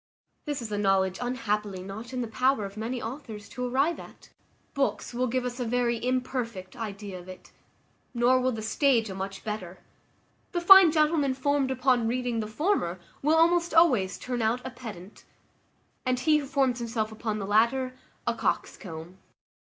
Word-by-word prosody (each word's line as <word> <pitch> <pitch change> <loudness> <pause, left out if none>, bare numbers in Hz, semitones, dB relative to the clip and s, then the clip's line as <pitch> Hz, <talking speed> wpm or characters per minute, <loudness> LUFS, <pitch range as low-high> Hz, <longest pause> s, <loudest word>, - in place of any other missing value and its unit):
This 290 -4 -2
is 220 - -6
a 205 - -1
knowledge 190 -2 +2
unhappily 210 -6 -2
not 215 +5 -8
in 255 -1 -2
the 235 - -3
power 250 0 +1
of 195 0 -8
many 230 +4 -3
authors 225 -4 -7
to 250 0 -4
arrive 275 +7 +1
at. - - -13 0.4
Books 275 -2 -1
will 250 +1 0
give 255 +1 -1
us 250 +1 -4
a - - 0
very 235 0 0
imperfect 250 -7 -2
idea 205 -4 -6
of 180 +1 -13
it; 185 - -12 0.6
nor 245 +1 +3
will 255 0 +2
the 220 -2 -5
stage 225 -1 +2
a - - -5
much 195 +1 -6
better: 190 -4 -5 0.8
the 350 - +1
fine 370 -1 +9
gentleman 305 -3 +2
formed 280 0 +1
upon 255 -2 +2
reading 245 -1 -1
the 215 - -2
former 220 - 0 0.2
will 305 +3 +3
almost 340 +1 +3
always 250 - +4
turn 250 -1 -3
out 230 +3 0
a 260 - -4
pedant, 210 -6 -10 0.8
and 255 -1 0
he 305 +2 +4
who 285 - -6
forms 265 -4 +1
himself 225 -2 -2
upon 220 -1 -3
the 200 - -4
latter, 235 +5 +2 0.3
a - - +1
coxcomb. 170 0 -4
240 Hz, 175 wpm, -27 LUFS, 210-260 Hz, 0.8 s, fine